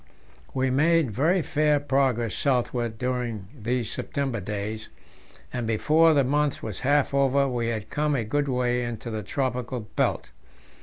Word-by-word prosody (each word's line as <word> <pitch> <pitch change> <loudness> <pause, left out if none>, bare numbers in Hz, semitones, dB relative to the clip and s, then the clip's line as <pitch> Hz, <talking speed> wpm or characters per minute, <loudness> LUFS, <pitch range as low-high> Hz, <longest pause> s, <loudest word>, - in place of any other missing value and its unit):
We 130 0 +1
made 155 0 +3
very 160 - +2
fair 150 -1 +2
progress 130 -6 +1
southward 120 -4 0
during 120 -5 -3
these 120 -1 -2
September 135 -5 -2
days, 105 +2 -4 0.6
and 120 -3 -2
before 155 +8 +4
the 140 - +4
month 145 +2 0
was 105 -4 -5
half 140 +1 +2
over 140 0 +3
we 120 -3 -1
had 110 -3 -3
come 150 0 +1
a 120 - 0
good 145 +6 -1
way 125 -1 0
into 120 0 -5
the 110 -1 -3
tropical 125 +2 -2
belt. 105 - -2
125 Hz, 150 wpm, -26 LUFS, 115-140 Hz, 0.6 s, before